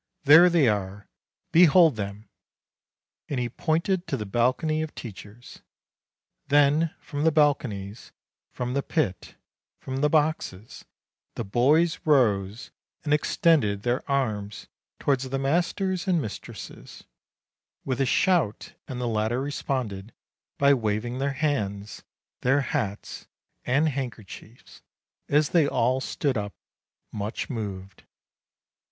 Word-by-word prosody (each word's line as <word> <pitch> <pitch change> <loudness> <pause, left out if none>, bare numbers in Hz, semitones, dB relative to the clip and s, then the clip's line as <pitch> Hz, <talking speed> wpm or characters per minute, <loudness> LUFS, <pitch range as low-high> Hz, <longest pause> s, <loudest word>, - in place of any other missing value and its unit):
There 160 +5 +8
they 165 -6 +3
are; 100 -1 -2 0.4
behold 165 -3 +6
them!" 100 +1 -6 1.0
And 140 - -2
he 120 -1 -2
pointed 170 - -1
to 135 - -2
the 105 - -5
balcony 130 - 0
of 155 -1 -6
teachers. 110 +1 -11 0.9
Then, 145 +3 +3
from 145 -1 -5
the 160 - +4
balconies, 125 -9 0 0.4
from 125 0 -4
the 140 - 0
pit, 135 - -2 0.4
from 130 0 -5
the 150 +2 +2
boxes, 145 - -1 0.5
the - - -3
boys 150 +11 +2
rose, 110 -7 +1 0.3
and 150 -2 0
extended 145 -9 +2
their 120 +1 0
arms 110 -7 -2 0.3
towards 135 -2 0
the 135 - -2
masters 180 +6 -1
and 180 -3 +2
mistresses, 110 -8 -8 0.8
with 130 -1 -1
a - - +3
shout, 165 - +1
and 125 - -6
the 125 - -2
latter 110 +2 0
responded 130 -7 -4 0.4
by 140 0 +5
waving 120 +1 -2
their 140 0 -1
hands, 105 -9 -2 0.4
their 135 +3 +3
hats, 120 -9 -4 0.4
and 145 +5 +2
handkerchiefs, 120 -4 -8 0.5
as 150 +1 +3
they 165 -5 +3
all 130 0 +1
stood 135 -3 -1
up, 100 -1 -6 0.6
much 105 +5 -4
moved. 100 -5 -6
130 Hz, 120 wpm, -26 LUFS, 105-150 Hz, 1.0 s, There